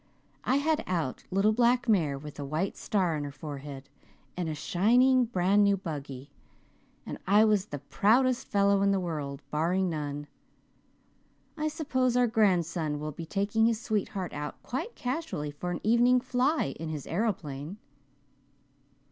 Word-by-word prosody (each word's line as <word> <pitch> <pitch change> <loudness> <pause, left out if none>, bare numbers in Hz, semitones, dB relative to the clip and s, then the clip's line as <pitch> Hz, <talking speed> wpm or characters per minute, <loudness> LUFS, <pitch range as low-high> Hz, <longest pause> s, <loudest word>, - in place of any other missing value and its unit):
I 255 - +2
had 310 +2 +1
out 165 -8 -2
little 195 +3 +3
black 245 +2 +3
mare 165 -11 +2
with 150 +1 -9
the 145 - -4
white 155 +7 -2
star 185 -6 0
on 150 - -3
her 145 - -5
forehead, 140 -2 -8 0.5
and 175 -3 -2
a 155 - -3
shining 245 - +3
brand 200 -1 +3
new 200 -1 +3
buggy 140 -6 -7 0.7
and - - -6
I 205 +3 +6
was 210 -2 +2
the 145 - -5
proudest 220 - +2
fellow 200 -4 +3
in 200 - +3
the 195 -1 +2
world, 150 -6 -4
barring 175 +4 +1
none. 145 -2 -4 1.3
I 310 0 -1
suppose 260 -5 0
our 250 - +5
grandson 175 -9 +1
will 150 +1 -4
be 160 +3 -8
taking 210 +4 +1
his 230 -2 0
sweetheart 205 -5 -2
out 150 0 -5
quite 330 - -4
casually 250 - -3
for 165 +5 -5
an 175 - -2
evening 240 +3 +4
'fly' 255 - 0
in 165 0 -4
his 150 -3 -5
aeroplane." 170 -5 -3
190 Hz, 155 wpm, -29 LUFS, 150-235 Hz, 1.3 s, I